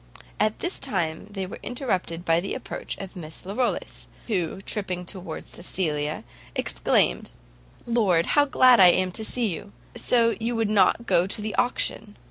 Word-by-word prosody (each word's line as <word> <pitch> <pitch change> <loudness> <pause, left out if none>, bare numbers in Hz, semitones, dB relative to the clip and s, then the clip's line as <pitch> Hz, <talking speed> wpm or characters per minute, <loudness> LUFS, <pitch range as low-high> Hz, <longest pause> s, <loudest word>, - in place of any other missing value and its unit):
At 215 0 +2
this 355 +2 -2
time 175 -9 -1
they 195 -2 -4
were 185 - -8
interrupted 185 -9 -3
by 165 0 +4
the 185 - -3
approach - - -6
of 195 -1 -8
Miss 160 -2 -9
Larolles, 220 +6 -2 0.2
who, 190 -5 -1
tripping 185 -3 -3
towards 185 +1 -6
Cecilia, 155 -4 -2 0.3
exclaimed, 60 0 +1 0.6
"Lord, 205 -8 +2
how 290 -1 +5
glad 255 -3 +6
I 185 - +9
am 185 +1 +3
to 220 - -4
see 240 +2 0
you! 200 +5 -9 0.2
So 230 -2 +3
you 235 +1 -1
would 225 -2 0
not 210 +3 +3
go 175 -4 +3
to 200 - -2
the 210 0 -3
auction! 235 -4 -1
195 Hz, 160 wpm, -25 LUFS, 175-230 Hz, 0.6 s, I